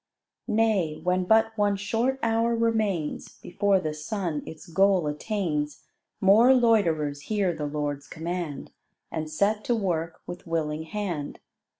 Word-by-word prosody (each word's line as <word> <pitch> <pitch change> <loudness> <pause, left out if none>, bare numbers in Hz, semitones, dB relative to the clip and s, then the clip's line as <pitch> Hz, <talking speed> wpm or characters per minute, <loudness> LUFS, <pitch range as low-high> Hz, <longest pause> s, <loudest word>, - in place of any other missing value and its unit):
Nay, 210 -9 +1
when 180 0 +1
but 220 +2 +3
one 205 -2 +2
short 225 +6 0
hour 230 +1 +2
remains 215 -9 -1
Before 200 +1 +1
the 155 -4 -3
sun 155 0 -3
its 160 +1 -9
goal 190 0 +3
attains, 150 -2 -2 0.4
More 225 +7 +6
loiterers 165 - +2
hear 200 -5 +1
the 150 -2 -3
Lord's 145 -1 -3
command 165 -3 -5 0.4
And 155 -1 -3
set 205 +7 +1
to 240 - +2
work 170 -6 -2
with 175 - -8
willing 160 -1 -2
hand. 175 -6 -4
185 Hz, 130 wpm, -26 LUFS, 155-215 Hz, 0.4 s, More